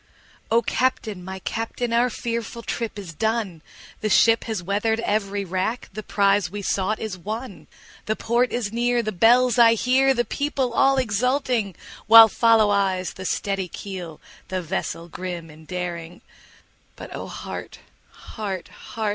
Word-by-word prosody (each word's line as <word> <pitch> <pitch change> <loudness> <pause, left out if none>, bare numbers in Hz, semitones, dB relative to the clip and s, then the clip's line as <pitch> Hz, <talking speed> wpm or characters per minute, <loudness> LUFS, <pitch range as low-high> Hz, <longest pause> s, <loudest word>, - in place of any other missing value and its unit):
O 230 +1 +3
CAPTAIN! 220 -7 -1
my 190 +1 -6
Captain! 230 +4 -3
our 240 +2 +3
fearful 235 0 -4
trip 230 -2 -4
is 190 -5 -7
done, 220 -3 -1 0.4
The 215 - -1
ship 225 +2 +4
has 220 -6 -3
weather'd 210 +4 0
every 205 -2 -1
rack, 190 +6 -2
the 215 - -5
prize 200 -3 +2
we 205 +2 -6
sought 195 +3 0
is 205 -4 -5
won, 220 +4 -6 0.4
The 215 - +1
port 240 +3 +1
is 225 -3 -2
near, 240 0 +1
the 215 - -2
bells 240 +5 +4
I 230 -1 +7
hear, 265 +3 +3
the 240 0 +1
people 280 -4 -2
all 270 +2 +4
exulting, 245 - 0 0.3
While 225 +1 +10
follow 225 -1 +4
eyes 190 -2 0
the 190 - -8
steady 195 0 -1
keel, 180 -3 -7 0.3
the 185 -1 -3
vessel 165 +1 -4
grim 175 -2 -6
and 155 +1 -16
daring; 175 -1 -5 0.7
But - - -9
O - - -6
heart! - - -7 0.3
heart! 195 -5 -6
heart! 220 -2 -5
215 Hz, 155 wpm, -23 LUFS, 190-235 Hz, 0.7 s, While